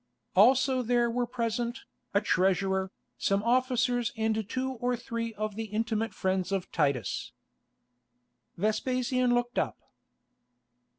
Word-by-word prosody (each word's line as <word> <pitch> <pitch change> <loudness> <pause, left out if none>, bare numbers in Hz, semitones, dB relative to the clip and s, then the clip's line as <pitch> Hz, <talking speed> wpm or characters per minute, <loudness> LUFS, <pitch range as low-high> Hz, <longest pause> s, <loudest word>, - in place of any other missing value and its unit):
Also 255 +5 +5
there 240 0 +2
were 245 +1 0
present, 235 +1 -2 0.3
a 200 - +3
treasurer, 190 -1 +1 0.3
some 200 +1 +1
officers 245 0 +2
and 220 -1 0
two 260 +2 -1
or 245 0 +1
three 230 -1 -4
of 215 -1 -3
the 225 +1 -3
intimate 220 +1 -1
friends 190 -1 -1
of 195 -2 -2
Titus. 140 - -1 1.2
Vespasian 250 +5 +1
looked 240 0 0
up. - - -1
230 Hz, 115 wpm, -29 LUFS, 200-245 Hz, 1.2 s, Also